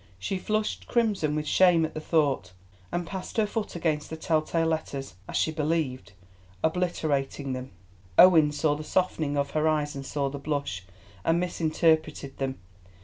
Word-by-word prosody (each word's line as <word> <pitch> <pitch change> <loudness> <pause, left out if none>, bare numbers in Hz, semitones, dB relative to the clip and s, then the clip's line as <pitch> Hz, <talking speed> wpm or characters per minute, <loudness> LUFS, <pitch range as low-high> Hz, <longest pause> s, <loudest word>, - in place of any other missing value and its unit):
She 185 - -3
flushed 215 +3 -2
crimson 205 -11 +1
with 155 0 -2
shame 175 0 +5
at 160 - -6
the - - -4
thought, 155 - +1 0.4
and 175 0 -1
passed 190 +5 -6
her 220 - +4
foot 210 -1 -4
across 155 -3 -1
the 160 - -6
tell 160 -1 +1
tale 165 +1 0
letters, 155 -4 -2 0.2
as - - -1
she 160 - +2
believed, 150 -8 -2 0.5
obliterating 150 -5 0
them. 130 0 -5 0.5
Owen 165 -5 +8
saw 150 0 +1
the 150 +1 -5
softening 155 -4 0
of 140 0 0
her 155 0 +1
eyes 150 -2 +1
and 135 - -5
saw 140 0 -1
the 140 +1 -5
blush, 140 - -3 0.4
and 165 +1 +2
misinterpreted 160 -4 0
them. 135 -1 -2
155 Hz, 165 wpm, -27 LUFS, 145-170 Hz, 0.5 s, Owen